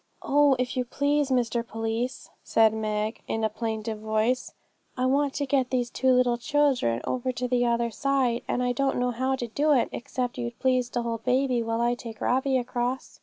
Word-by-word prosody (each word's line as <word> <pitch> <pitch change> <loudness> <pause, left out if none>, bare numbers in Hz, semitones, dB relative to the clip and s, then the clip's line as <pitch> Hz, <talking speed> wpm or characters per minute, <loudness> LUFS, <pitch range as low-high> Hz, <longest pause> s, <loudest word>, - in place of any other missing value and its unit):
'Oh, 285 -1 +4
if 250 0 -2
you 255 - +1
please, 285 +3 0
Mr 240 -2 +1
Police,' 225 +2 -4
said 220 -1 +4
Meg, 215 0 -2
in 225 - -2
a 220 - +2
plaintive 220 0 -4
voice, 220 +4 0 0.5
'I 255 - +1
want 275 +1 +2
to 285 - -1
get 265 -2 +1
these 245 -2 -1
two 260 -1 +2
little 250 -1 +3
children 270 - +1
over 255 0 -1
to 250 +1 -2
the 245 -1 +2
other 235 0 +1
side, 265 -2 +1
and 250 - 0
I 250 - +1
don't 270 +2 0
know 250 0 +1
how 260 +3 0
to 250 - -4
do 290 +6 +1
it, 255 - +2
except 245 0 -4
you'd 235 -1 -4
please 255 -2 +1
to 240 -1 -2
hold 230 -1 -3
baby 255 -1 +2
while 225 0 -1
I 240 0 +2
take 230 -3 -8
Robbie 265 +1 +1
across.' 245 +1 -3
245 Hz, 200 wpm, -26 LUFS, 230-260 Hz, 0.5 s, Oh